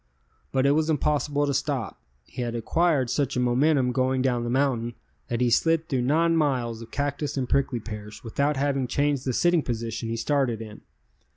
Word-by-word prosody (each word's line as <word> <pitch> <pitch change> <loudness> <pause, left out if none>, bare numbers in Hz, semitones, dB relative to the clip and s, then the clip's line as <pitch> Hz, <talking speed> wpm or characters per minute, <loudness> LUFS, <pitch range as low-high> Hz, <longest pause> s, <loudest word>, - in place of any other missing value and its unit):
But 135 0 +1
it 140 - +5
was 155 +2 +1
impossible 145 -1 +1
to 140 - 0
stop, 135 -2 -2 0.2
he 125 - -7
had 120 -1 -2
acquired 135 +2 +1
such 140 -4 0
a - - +2
momentum 125 +2 +2
going 130 0 +1
down 125 -2 +1
the 120 - -3
mountain 120 -3 0 0.3
that 120 0 -2
he 120 -1 +2
slid 165 +5 +2
through 130 -3 0
nine 165 +6 +2
miles 125 -7 0
of 115 - -10
cactus 145 0 -2
and 130 -2 -1
prickly 135 -2 +1
pears 105 -1 -8
without 140 +5 0
having 135 -2 0
changed 140 +1 0
the 130 - 0
sitting 175 +4 +3
position 115 -2 -4
he 115 - -2
started 130 -2 0
in. 110 -1 -9
130 Hz, 190 wpm, -26 LUFS, 120-145 Hz, 0.3 s, it